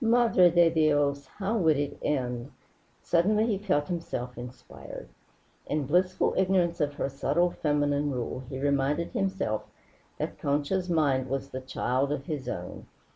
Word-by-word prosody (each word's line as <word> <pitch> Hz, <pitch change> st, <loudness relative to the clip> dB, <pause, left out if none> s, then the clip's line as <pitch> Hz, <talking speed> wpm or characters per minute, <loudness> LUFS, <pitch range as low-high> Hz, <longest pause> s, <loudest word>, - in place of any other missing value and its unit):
Madre 230 Hz, -6 st, +5 dB
de 175 Hz, 0 st, +5 dB
Dios! 145 Hz, -3 st, +2 dB
How 200 Hz, +8 st, -3 dB
would 160 Hz, -7 st, +3 dB
it 145 Hz, 0 st, -2 dB
end? 125 Hz, -3 st, -2 dB, 0.5 s
Suddenly 210 Hz, +6 st, +3 dB
he 210 Hz, -4 st, 0 dB
felt 185 Hz, -8 st, 0 dB
himself 125 Hz, -8 st, -4 dB
inspired. 125 Hz, +1 st, -9 dB, 0.6 s
In 150 Hz, -1 st, -1 dB
blissful 180 Hz, +6 st, +2 dB
ignorance 180 Hz, -3 st, +2 dB
of 145 Hz, -1 st, 0 dB
her -, -, -1 dB
subtle 175 Hz, +6 st, +1 dB
feminine 145 Hz, -2 st, 0 dB
rule, 125 Hz, -1 st, -3 dB
he 130 Hz, -, -5 dB
reminded 140 Hz, +3 st, 0 dB
himself 190 Hz, -, -1 dB, 0.5 s
that -, -, -4 dB
Concha's 150 Hz, +6 st, 0 dB
mind 140 Hz, -6 st, +2 dB
was 135 Hz, +1 st, -3 dB
the 130 Hz, -, -5 dB
child 130 Hz, +1 st, -1 dB
of 140 Hz, -2 st, -3 dB
his 140 Hz, -6 st, -4 dB
own. 90 Hz, -5 st, -6 dB
145 Hz, 145 wpm, -28 LUFS, 135-175 Hz, 0.6 s, Madre